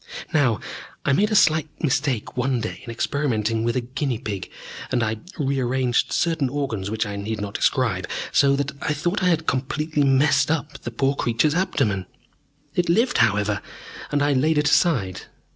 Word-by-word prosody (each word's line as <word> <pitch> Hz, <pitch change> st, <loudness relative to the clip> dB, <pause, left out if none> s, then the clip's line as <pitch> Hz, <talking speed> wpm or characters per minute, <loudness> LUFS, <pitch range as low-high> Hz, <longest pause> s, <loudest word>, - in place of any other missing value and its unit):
"Now, 135 Hz, -8 st, +3 dB, 0.5 s
I 140 Hz, -, +3 dB
made 205 Hz, +9 st, +3 dB
a 215 Hz, -, 0 dB
slight 155 Hz, -4 st, +4 dB
mistake 130 Hz, -6 st, 0 dB
one 125 Hz, 0 st, 0 dB
day 110 Hz, -1 st, -5 dB
in 120 Hz, -, -9 dB
experimenting 115 Hz, -3 st, -1 dB
with 115 Hz, 0 st, 0 dB
a 130 Hz, -, +1 dB
guinea 130 Hz, +1 st, -2 dB
pig, 100 Hz, -3 st, -5 dB, 0.4 s
and 125 Hz, -2 st, +1 dB
I 110 Hz, 0 st, -1 dB, 0.2 s
re 140 Hz, -3 st, 0 dB
arranged 125 Hz, 0 st, +1 dB
certain 160 Hz, -6 st, +1 dB
organs 125 Hz, -8 st, -3 dB
which 110 Hz, +1 st, -1 dB
I 100 Hz, -1 st, -5 dB
need 105 Hz, +2 st, -4 dB
not 100 Hz, 0 st, -4 dB
describe -, -, +1 dB, 0.2 s
so 140 Hz, 0 st, +4 dB
that 140 Hz, +1 st, -1 dB
I 150 Hz, -, 0 dB
thought 175 Hz, +7 st, -1 dB
I 180 Hz, -, +2 dB
had 165 Hz, -2 st, +1 dB
completely 150 Hz, +3 st, 0 dB
messed 135 Hz, +2 st, +3 dB
up 150 Hz, -2 st, -2 dB
the -, -, -5 dB
poor 135 Hz, +4 st, +1 dB
creature's 125 Hz, +3 st, +1 dB
abdomen. 120 Hz, -, 0 dB, 0.7 s
It 175 Hz, 0 st, 0 dB
lived, 230 Hz, +8 st, +3 dB
however, 105 Hz, -1 st, +2 dB, 0.5 s
and 145 Hz, -1 st, +2 dB
I 145 Hz, 0 st, +3 dB
laid 150 Hz, +4 st, +2 dB
it 150 Hz, 0 st, +3 dB
aside. 100 Hz, -, +1 dB
135 Hz, 175 wpm, -23 LUFS, 115-150 Hz, 0.7 s, slight